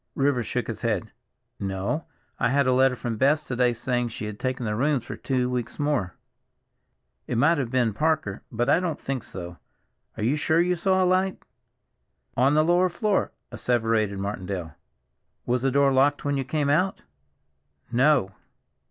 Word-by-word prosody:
Rivers 135 -4 +1
shook 125 - -2
his 115 - -6
head. 110 -6 -1 0.5
"No, 95 +10 -2 0.3
I 125 - +2
had 140 +1 +2
a 130 - +3
letter 130 0 +4
from 120 -2 -4
Bess 145 +5 +3
to 130 - -4
day 125 0 +3
saying 120 +1 -1
she 110 -2 -6
had 105 -1 -6
taken 130 -1 -2
the 105 - -1
rooms 135 +1 +1
for - - -6
two 130 -2 -1
weeks 125 -2 -3
more. 145 - -1 1.1
It 120 - -1
might 150 +5 +4
have 130 -4 -2
been 120 -3 +1
Parker, 140 -6 0
but 120 +1 -1
I - - +4
don't 175 -4 -2
think 135 -2 -3
so. 90 -3 -8 0.6
Are - - -3
you 130 +7 +2
sure 160 +2 +2
you 180 +1 +2
saw 190 +2 +2
a - - +3
light?" 185 +1 +1 0.9
"On 135 +4 +3
the 155 0 +4
lower 175 +2 +3
floor," 205 +3 0 0.2
asseverated 115 -4 0
Martindale. 95 -4 -4 0.7
"Was 125 0 0
the 135 - +2
door 140 +1 +3
locked 140 +3 +2
when 145 0 +1
you 135 -1 -1
came 145 0 0
out?" 185 +6 +1 0.9
"No." 130 -4 +3
130 Hz, 175 wpm, -25 LUFS, 115-150 Hz, 1.1 s, letter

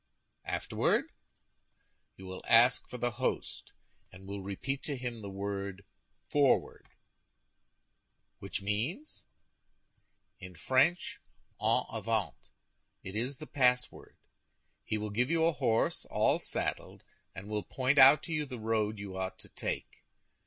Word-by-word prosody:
"Afterward?" - - 0 1.0
"You 95 - -12
will 95 0 -7
ask 120 +3 +5
for 125 - -6
the 120 0 0
host, 125 +2 -3 0.4
and 95 +1 -13
will 100 0 -5
repeat 110 +8 -4
to 145 -3 -2
him 120 -2 -5
the 100 - -6
word 100 0 -4 0.4
'Forward!'" 145 -3 +1 1.5
"Which - - -5
means?" 120 - -3 1.1
"In 90 0 -10
French, 130 - +2 0.4
En - - +3
avant. 110 -9 -1 0.7
It 95 - -7
is 125 +5 -1
the 155 - -8
password. 125 -4 0 0.7
He 110 - -2
will 105 0 -4
give 120 +5 +1
you 165 -1 +3
a 165 - +4
horse 120 -5 +1
all - - +2
saddled, - - -3 0.3
and 95 +1 -8
will 105 0 -1
point 130 +6 +1
out 135 +3 +9
to 165 - -4
you 150 -2 -1
the 130 -2 -6
road 110 -1 0
you 100 -2 -7
ought 95 0 -3
to - - -10
take. - - -5
115 Hz, 130 wpm, -32 LUFS, 100-130 Hz, 1.5 s, out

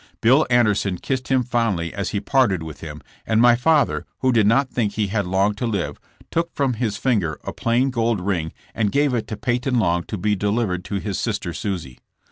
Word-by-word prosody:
Bill 130 +7 +4
Anderson 105 -6 +2
kissed 130 +4 -3
him 130 -2 +2
fondly 115 -9 -1
as 100 -1 -3
he 100 - -1
parted 100 -9 +2
with 80 -2 -9
him, 75 -2 -8 0.2
and 110 0 +1
my 120 0 +6
father, 150 +4 +2
who 130 - +3
did 110 -4 +3
not 130 +5 +3
think 110 -5 -1
he 105 0 0
had 100 -2 -1
long 95 +3 +2
to 110 +4 -3
live 100 -5 -2 0.3
took 170 +1 -1
from 135 -3 +1
his 110 -3 -2
finger 100 - 0
a - - -5
plain 120 +3 +1
gold 115 -3 0
ring 90 -4 -2 0.2
and 105 -3 0
gave 145 -1 +2
it 115 -3 -1
to 110 - -5
Peyton 125 +1 0
Long 85 -5 +2
to 105 - -5
be 105 +3 +1
delivered 100 -2 -1
to 100 - -4
his 100 0 -3
sister 100 -6 -2
Susie. 85 - -4
110 Hz, 210 wpm, -22 LUFS, 95-125 Hz, 0.3 s, my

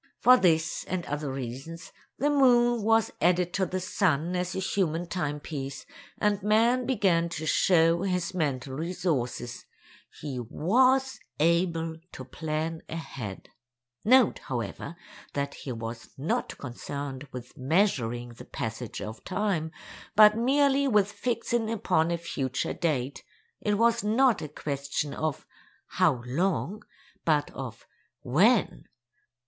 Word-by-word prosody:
For 250 - +8
this 165 -7 +2
and 180 -1 -3
other 145 -1 -3
reasons, 135 +6 -6 0.3
the 290 +4 +2
moon 240 -4 +4
was 225 +1 +3
added 175 +1 +2
to 190 -2 +1
the 185 +2 -2
sun 180 -3 0
as 180 +1 -2
a - - -1
human 175 -3 0
timepiece, 150 -5 -4 0.3
and 210 -1 +1
man 230 +5 +3
began 185 -9 +2
to 160 -2 -5
show 165 0 +4
his 180 -2 -1
mental 140 -6 -2
resources—he 140 -3 -4
was 255 - +2 0.2
able 165 0 +1 0.2
to 130 - -8
plan 160 +4 -3
ahead. 130 - -6 0.5
Note, 255 0 +5
however, 120 - -5 0.4
that 140 0 -2
he 135 - -7
was 115 0 -6
not 140 +5 -2
concerned 140 +1 -6
with 125 -1 -9
measuring 130 - +1
the 120 - -12
passage 115 +1 -5
of 110 +1 -8
time, 185 -5 -1 0.5
but 210 0 +8
merely 275 +3 +3
with 205 -5 +3
fixing 230 +1 -1
upon 170 -7 +1
a 170 - 0
future 135 -6 -2
date; 140 -5 -2 0.4
it 210 -1 +1
was 235 +1 +3
not 230 +3 +3
a 150 - -5
question 140 0 -3
of 155 -3 -3 0.4
how 120 -2 +2
long 185 +8 -1 0.4
but 150 -3 +1
of 120 -3 -8 0.4
when. 195 - +3
165 Hz, 125 wpm, -28 LUFS, 140-210 Hz, 0.5 s, For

